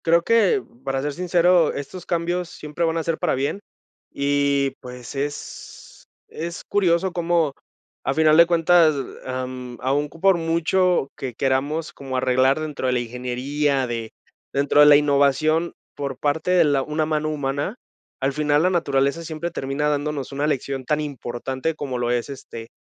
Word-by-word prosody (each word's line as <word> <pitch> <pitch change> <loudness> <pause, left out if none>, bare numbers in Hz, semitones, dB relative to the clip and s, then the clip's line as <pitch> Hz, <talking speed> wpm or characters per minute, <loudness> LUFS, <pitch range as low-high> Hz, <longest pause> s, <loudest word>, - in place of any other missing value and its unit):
Creo 170 +1 +4
que, 230 - +3 0.2
para 135 0 -1
ser 145 0 -2
sincero, 175 0 +3
estos 155 +6 -7
cambios 175 0 -1
siempre 150 +2 -5
van 165 0 0
a 165 - -1
ser 165 -1 -2
para - - +1
bien 140 +8 -2 0.5
y, 140 -1 +1
pues, 125 -1 -9
es 145 +1 -7 0.2
es 170 +1 -6
curioso 185 -2 +1
cómo, 170 -4 +1 0.5
a 135 - +1
final 155 +1 +4
de 170 - +9
cuentas, 170 -2 +4 0.3
am, 130 -1 -5
aún 140 +3 0
por 185 +4 +2
mucho 170 -1 +1
que 130 -2 -5
queramos 140 +5 -1
como 135 -1 -6
arreglar 130 +2 +3
dentro 150 -4 -3
de 125 - +2
la 125 - +1
ingeniería, 130 +4 -1
de 115 -2 -4 0.4
dentro 140 +1 +2
de 150 - +9
la 145 - +9
innovación 145 +3 +2 0.2
por 140 -3 -5
parte 155 +4 0
de 180 -2 +5
la 145 -3 +2
una 155 +2 -1
mano 155 0 -1
humana, 145 - -2 0.5
al 135 +1 +1
final 150 0 +2
la 180 - +4
naturaleza 140 -2 +1
siempre 165 +2 -4
termina 140 0 -2
dándonos 145 -2 -2
una 140 +2 -1
lección 135 -2 -2
tan 150 +3 +1
importante 130 +1 -4
como 135 -4 -4
lo 120 0 -1
es, 120 +2 -1
este, 115 -4 -9
145 Hz, 165 wpm, -22 LUFS, 135-165 Hz, 0.5 s, de